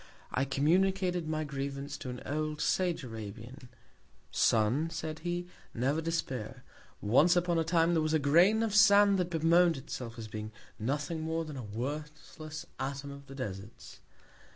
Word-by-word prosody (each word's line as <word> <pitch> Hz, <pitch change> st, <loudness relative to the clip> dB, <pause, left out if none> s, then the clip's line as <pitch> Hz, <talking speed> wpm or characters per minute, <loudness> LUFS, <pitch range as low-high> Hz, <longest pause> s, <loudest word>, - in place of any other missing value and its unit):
I 135 Hz, -, +1 dB
communicated 180 Hz, +5 st, +1 dB
my 155 Hz, 0 st, -1 dB
Grievance 140 Hz, -1 st, -4 dB
to 130 Hz, -, -6 dB
an 125 Hz, 0 st, -7 dB
old 155 Hz, +1 st, -2 dB
Sage 175 Hz, -1 st, +1 dB
Arabian. 115 Hz, +3 st, -8 dB, 0.6 s
Son, 120 Hz, +9 st, +2 dB
said 160 Hz, -1 st, -5 dB
he, 175 Hz, +1 st, -3 dB, 0.3 s
never 135 Hz, +6 st, +1 dB
despair; 130 Hz, -7 st, -3 dB, 0.4 s
once 145 Hz, -, +4 dB
upon 175 Hz, -1 st, +2 dB
a -, -, +2 dB
Time, 165 Hz, +1 st, +2 dB
there 165 Hz, -, +3 dB
was 155 Hz, 0 st, +1 dB
a -, -, +6 dB
Grain 175 Hz, +10 st, +4 dB
of 220 Hz, -3 st, -1 dB
Sand, 205 Hz, -2 st, +6 dB
that 180 Hz, -1 st, 0 dB
bemoan'd 170 Hz, 0 st, +4 dB
itself, 120 Hz, -2 st, -7 dB
as 110 Hz, -1 st, -6 dB
being 110 Hz, 0 st, -6 dB, 0.3 s
nothing 145 Hz, +7 st, -2 dB
more 160 Hz, +1 st, -2 dB
than 150 Hz, -2 st, -7 dB
a 130 Hz, -, -5 dB
worthless 150 Hz, +7 st, -6 dB
Atom 140 Hz, +1 st, -4 dB
of 140 Hz, 0 st, -11 dB
the 135 Hz, -, -10 dB
Deserts. 100 Hz, -5 st, -7 dB
150 Hz, 155 wpm, -31 LUFS, 130-170 Hz, 0.6 s, a